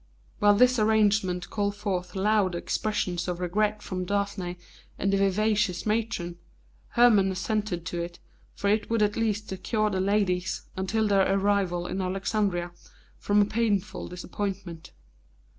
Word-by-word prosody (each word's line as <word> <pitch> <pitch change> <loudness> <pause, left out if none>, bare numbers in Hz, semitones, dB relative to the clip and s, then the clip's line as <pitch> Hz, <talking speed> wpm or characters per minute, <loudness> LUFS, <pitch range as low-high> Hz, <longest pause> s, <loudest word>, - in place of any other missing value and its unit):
While 205 0 +5
this 250 +2 +4
arrangement 210 -4 +2
called 205 -1 -1
forth 185 -3 -3
loud 195 -2 +2
expressions 180 -1 -2
of 180 -1 -3
regret 210 +4 0
from 185 -1 -3
Daphne 195 -2 -2 0.4
and 195 +1 0
the - - +3
vivacious 200 0 +1
matron, 210 -6 -2 0.5
Hermon 215 -5 +5
assented 190 -2 -2
to 170 +1 -3
it, 170 0 -6 0.4
for 200 - -2
it 210 0 0
would 230 -2 +2
at 205 0 +1
least 215 -2 -1
secure 210 +3 -1
the 190 -1 0
ladies, 190 -3 0
until 215 +4 0
their 195 -1 +3
arrival 195 -3 +1
in 190 - -3
Alexandria, 190 -1 -1 0.5
from 205 0 +3
a - - +1
painful 210 -3 -1
disappointment. 180 -1 -5
200 Hz, 140 wpm, -27 LUFS, 180-210 Hz, 0.5 s, While